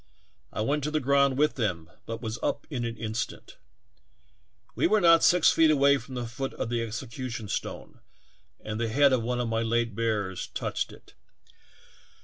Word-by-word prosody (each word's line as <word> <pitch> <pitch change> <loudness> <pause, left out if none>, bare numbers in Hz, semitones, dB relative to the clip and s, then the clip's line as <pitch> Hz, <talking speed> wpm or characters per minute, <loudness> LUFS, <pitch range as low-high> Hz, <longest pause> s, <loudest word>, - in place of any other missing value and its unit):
I - - -3
went 145 +6 0
to - - 0
the 155 0 0
ground 140 -1 +3
with 150 0 +2
them, 90 -9 -2 0.2
but 115 +1 -5
was 110 +1 -4
up - - -2
in 125 -4 -2
an 115 0 -4
instant. 110 +1 -5 1.2
We - - +2
were 215 - +3
not 165 -3 +6
six 180 -2 +5
feet 160 -1 +4
away 140 -1 +4
from 130 +2 -10
the 125 -1 -3
foot 130 +3 -5
of 120 - -3
the 120 -1 -1
execution 115 +1 -5
stone, - - -5 0.6
and 110 +1 -5
the 115 -1 -1
head 140 +4 +4
of 125 - +2
one 125 +2 -2
of 120 - -1
my 115 0 0
late 115 0 0
bearers 105 -4 -2
touched - - -3
it. - - -16
120 Hz, 180 wpm, -27 LUFS, 115-140 Hz, 1.2 s, not